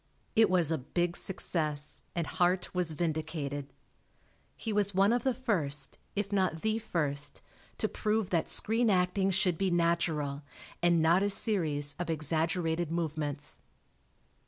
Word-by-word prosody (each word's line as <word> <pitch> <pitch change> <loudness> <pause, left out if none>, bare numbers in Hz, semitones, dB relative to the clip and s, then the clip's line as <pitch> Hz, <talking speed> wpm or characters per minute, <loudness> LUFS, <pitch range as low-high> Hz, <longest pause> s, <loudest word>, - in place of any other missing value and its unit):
It 225 -1 +5
was 175 -4 +3
a 160 - 0
big 175 +6 -1
success, 155 -6 -1
and 170 -2 0
Hart 180 +1 0
was 180 -3 0
vindicated. 155 -3 -3 0.9
He 225 - -3
was 205 -2 +2
one 195 +4 +4
of 245 - +1
the 265 - +1
first, 155 - -1 0.2
if 205 0 -2
not 185 -5 0
the 220 +1 +1
first, 150 -9 -1 0.3
to - - +1
prove 215 -2 -1
that 170 -3 +1
screen 225 +2 +2
acting 190 0 +2
should 180 -3 +1
be 195 -1 +1
natural, 170 -4 0 0.4
and 170 -2 +3
not 170 +4 +4
a 200 - +2
series 160 -9 +2
of 175 - -3
exaggerated 160 +1 0
movements. 150 -3 -3
170 Hz, 140 wpm, -30 LUFS, 155-195 Hz, 0.9 s, It